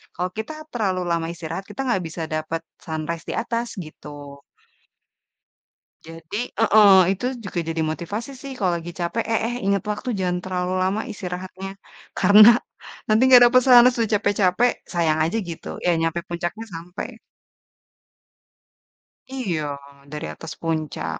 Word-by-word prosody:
kalau 180 0 -2
kita 220 +8 -4 0.2
terlalu 195 -6 -1
lama 165 -1 0
istirahat 170 +3 -6
kita 210 +6 -6
nggak 235 -6 +2
bisa 160 +1 -6
dapet 155 +1 -2 0.2
sunrise 160 +1 -4
di - - -3
atas 235 0 -2
gitu. 145 -4 -10 1.7
Jadi 165 +4 -8 0.2
heeh, 215 -3 +7 0.2
itu 200 +5 -3 0.2
juga 185 -3 -4
jadi 165 0 -1
motivasi 205 - -4
sih 275 -1 -7
kalau 185 -3 +1
lagi 170 +1 -7
capek, 175 +7 -1
"Eh 225 - +2
eh, 240 - -3
inget 200 -1 +1
waktu 230 +4 -5
jangan 180 -1 0
terlalu 180 -1 -2
lama 200 +4 0
istirahatnya, 185 0 -6 0.5
karena 205 +3 +8 0.6
nanti 215 +2 +3
nggak 250 -2 +9
dapet 255 +1 +6
sunrise, 245 -1 +7
sudah 225 -1 0
capek-capek, 205 +3 +2 0.2
sayang 160 -2 +2
aja," 190 +7 -1
gitu. 165 - -8 0.2
Ya 175 - +4
nyampe 165 +1 0
puncaknya, 175 +6 -4
sampe. 180 +8 -7 2.2
Iya, 155 -9 -2 0.4
dari 150 +2 -5
atas 165 0 -8
puncak. 155 - -3
180 Hz, 140 wpm, -23 LUFS, 165-215 Hz, 2.2 s, nggak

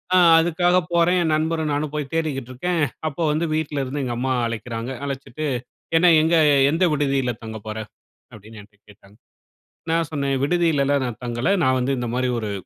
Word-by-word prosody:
அ - - +6 0.2
அதுக்காக 175 +2 +2 0.2
போறேன் 170 +2 +3
என் 160 - +1
நண்பரும், 160 -1 -1
நானும் 150 +1 -2
போயி 150 -2 -2
தேடிக்கிட்டுருக்கேன். 155 +2 -2 0.3
அப்போ 155 +3 -4
வந்து 160 +3 0
வீட்ல 145 -3 -2
இருந்து 140 +3 -4
எங்க 120 - -3
அம்மா 130 +1 0
அழைக்கிறாங்க. 115 +1 -5
அழைச்சுட்டு, 140 +2 -5 0.5
என்ன 175 0 +5
எங்க 160 +2 +2 0.4
எந்த 165 +4 +2
விடுதியில 135 -4 0
தங்க 110 0 -7
போற. 110 - -5 0.6
அப்டின்னு 110 0 -12
என்ட்ட 105 0 -22
கேட்டாங்க. 100 0 -20 0.8
நான் 165 -2 0
சொன்னேன், 140 -2 -1
விடுதியிலலாம் 145 -4 +1
நான் 120 -2 -6
தங்கல. 120 +6 -1 0.2
நான் 130 0 +3
வந்து 135 +2 0
இந்தமாரி 125 +1 -1
ஒரு 105 -2 -4
140 Hz, 160 wpm, -22 LUFS, 125-160 Hz, 0.8 s, அ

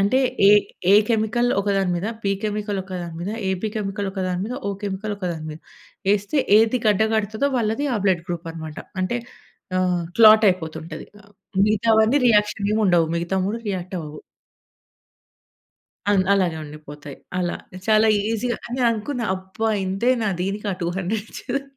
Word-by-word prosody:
అంటే 205 +7 +3 0.3
ఎ - - +8 0.4
ఎ - - +8
కెమికల్ 230 +2 +1
ఒకదాని 195 -2 0
మీద, 185 +5 -3 0.2
బి 195 - +2
కెమికల్ 210 -1 -2
ఒకదాని 180 -3 -6
మీద, 190 +4 -3 0.2
ఎబి 190 +3 -2
కెమికల్ 200 -1 -2
ఒకదాని 185 -2 -2
మీద 245 +3 -4
ఓ - - 0
కెమికల్ 205 +1 -3
ఒకదాని 170 -5 -4
మీద. 155 - -8 0.6
ఎస్తే 205 +8 -1 0.2
ఏది 225 +3 +3
గడ్డ 210 0 +4
గడుతదో 220 +5 0
వాళ్ళది 225 +5 0
ఆ - - +1
బ్లడ్ 180 -4 +2
గ్రూప్ 170 -1 -4
అన్నమాట. 160 -2 -8 0.2
అంటే 240 +6 -1 0.6
ఆహ్, 180 -1 +1 0.2
క్లాట్ 220 -1 +8
అయిపోతుంటది. 160 -3 -4 0.6
మిగతావన్నీ 220 +4 +3
రియాక్షన్ 210 -2 +2
ఏం - - +1
ఉండవు. 175 -3 +4
మిగతా 170 +3 -2
3 210 +4 -1
రియాక్ట్ 185 -1 -4
అవ్వవు. 150 -1 -8 1.9
అన్ 190 -2 +3
అలాగే 180 -5 +1
ఉండిపోతాయి. 150 -1 -10 0.2
అలా 175 -1 -1 0.3
చాలా 215 0 +5 0.2
ఈజీగా 235 +1 -1
అని 250 +2 -3
అనుకున్నా 230 +2 -2
అబ్బా! 190 +4 -3 0.2
ఇంతేనా 225 +4 +1
దీనికా 200 +2 -2
200 190 +5 -2
ఇచ్చేదని? 275 +2 -4
200 Hz, 145 wpm, -22 LUFS, 180-220 Hz, 1.9 s, ఎ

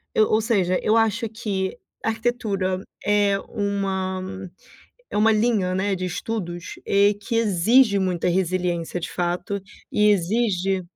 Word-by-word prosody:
eu 215 - +4
ou 215 +1 +3
seja, 190 -6 +1
eu 220 +2 +3
acho 225 0 +1
que 200 -2 -3 0.3
arquitetura 220 -5 -1 0.2
é 205 -1 +3
uma 195 -3 -2 0.9
é - - -4
uma 220 +1 +5
linha, 210 -4 +1
né, 195 +1 0
de 185 0 -3
estudos, 175 -2 -4
eh, 200 +1 +4
que 230 - -4
exige 220 +1 +4
muita 180 -2 0
resiliência, 175 -1 -1
de 165 - -5
fato, 180 +3 -2 0.3
e 210 0 +4
exige 195 -1 +1
200 Hz, 130 wpm, -23 LUFS, 185-220 Hz, 0.9 s, uma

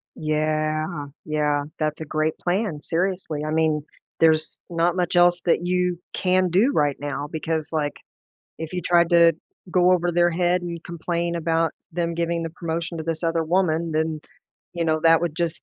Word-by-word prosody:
Yeah, 155 0 -1 0.2
yeah, 150 -2 0
that's 155 -1 -1
a - - -4
great 155 +1 -1
plan, 180 -3 -1
seriously. 170 -1 -2
I 155 - -2
mean, 155 -1 +1 0.4
there's 160 -1 +3
not 170 0 +1
much 180 -1 -1
else 175 0 +5
that 175 0 +2
you 180 -1 0
can 185 0 +2
do 200 +11 +3
right 145 -2 +2
now 145 0 -4
because, 160 -1 -2
like, 150 -2 0 0.7
if 160 +1 -6
you 180 - -2
tried 170 0 +3
to 170 -1 +6 0.4
go 180 +1 +4
over 175 -1 +2
their 175 0 +3
head 175 +1 +1
and 170 -1 -5
complain 170 0 -2
about 165 0 +1 0.2
them 170 0 -1
giving 170 0 -1
the 165 - -4
promotion 165 0 -4
to 160 - -4
this 165 0 -3
other 165 -1 +1
woman, 165 -1 +1
then, 155 0 -1 0.5
you 170 -1 -2
know, 155 0 +1
that 165 0 +6
would 170 -3 -2
just 170 -2 -2
165 Hz, 175 wpm, -23 LUFS, 155-175 Hz, 0.7 s, to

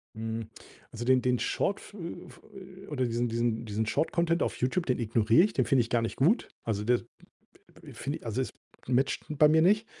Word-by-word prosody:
Hm, 110 0 -4 0.4
also 115 - -6
den 130 +1 +4
den 125 0 +1
Shortf 200 - -2
f 205 - -11
äh, 170 -1 -7
f - - -16 0.4
äh, - - -19
oder 135 -4 -2
diesen 120 +1 0
diesen 115 0 -1
diesen 110 +1 -2
Short 155 - 0
Content 170 0 +1
auf - - -2
YouTube, 145 +8 0
den 125 - +1
ignoriere 115 +5 +4
ich. 210 - 0
Den - - +1
finde 135 -4 +3
ich 115 - -4
gar 120 - +2
nicht 115 - -3
gut. 175 - +2 0.2
Also, 105 -2 -2
der 120 +1 +3
d - - -15 0.8
d - - -10
finde 140 +3 -4
ich - - -14
also, 115 +3 -1
es - - -5 0.4
matched 130 +2 +1
bei 150 0 +4
mir 160 +1 +4
nicht. 210 +5 +3
125 Hz, 230 wpm, -29 LUFS, 115-155 Hz, 0.8 s, den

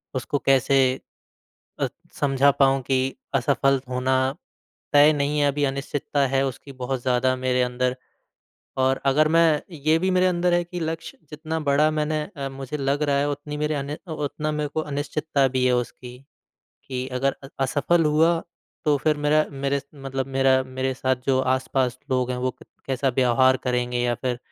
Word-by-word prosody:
उसको 130 +3 -1
कैसे 135 0 +4 1.0
अ, - - +2 0.3
समझा 140 -1 +4
पाऊँ 135 0 +4
कि 130 0 0 0.2
असफल 135 -1 +2
होना 130 +1 0 0.8
तय 145 +1 +7
नहीं 145 0 -1
है, 145 - +4
अभी 145 +1 0
अनिश्चितता 140 +1 -1
है। 135 +1 +1
उसकी 135 +2 -7
बहुत 130 0 -3
ज़्यादा 130 0 +2
मेरे 125 0 +1
अंदर 125 +1 -1 0.9
और 130 +1 +2
अगर 150 +3 +4
मैं 165 -2 +4
ये 155 +1 +1
भी 185 +3 0
मेरे 185 0 +3
अंदर 175 -1 +2
है 175 - +2
कि 175 +1 -7
लक्ष्य 160 0 -5
जितना 160 +1 -4
बड़ा 150 +1 +3
मैंने 155 0 -1 0.2
अ, 140 -1 -3
मुझे 135 +2 -6
लग 140 +1 -1
रहा 145 -2 +2
है 145 +1 +1
उतनी 145 +1 -5
मेरे 150 +1 -1
अनी 145 +1 -3 0.2
उतना 150 0 -3
मेरे 150 -1 -2
को 150 +2 -2
अनिश्चितता 145 -1 -1
भी 130 0 0
है 125 - +3
उसकी। 125 0 -5 0.7
कि 130 -1 -4
अगर 135 +1 +1
अ, - - -8
असफल 150 +5 +2
हुआ 160 +2 +3 0.4
तो 150 -2 +3
फिर 155 +2 +1
मेरा 150 +1 +2
मेरे 140 0 -1
मतलब 135 -2 -4
मेरा 135 0 +4
मेरे 130 0 -2
साथ 130 0 0
जो 135 -1 +3 0.2
आस-पास 130 -1 -1
लोग 130 -1 +1
हैं 125 - -2
वो 130 +1 0
क - - -15 0.2
कैसा 135 0 0
व्यवहार 130 +1 +4
करेंगे? 125 -1 0
या 120 0 +1
फिर 125 0 -3
140 Hz, 175 wpm, -24 LUFS, 130-150 Hz, 1.0 s, तय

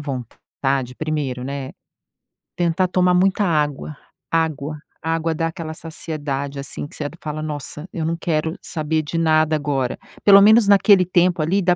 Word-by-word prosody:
vontade, 135 -1 -4
primeiro, 150 -5 -3
né, 135 0 -5 0.9
tentar 175 +1 +1
tomar 180 0 +2
muita 190 +3 +3
água, 150 -4 -1 0.4
água. 155 -2 -1 0.3
Água 165 0 0
dá 165 - -1
aquela 160 -1 -6
saciedade, 145 -4 -5
assim, 140 +1 -5
que - - -12
você 150 - -4 0.2
fala: 150 0 -4
"Nossa! 150 +1 -6
Eu 165 - -3
não 165 +1 -1
quero 160 0 -1
saber 155 -1 -2
de 165 +3 -3
nada 155 -1 +3
agora". 140 -4 -1 0.2
Pelo 200 -1 +8
menos 215 +1 +6
naquele 200 -1 +6
tempo 175 -2 +2
ali, 185 +6 +1
dá 180 -1 +3
155 Hz, 155 wpm, -21 LUFS, 145-175 Hz, 0.9 s, Pelo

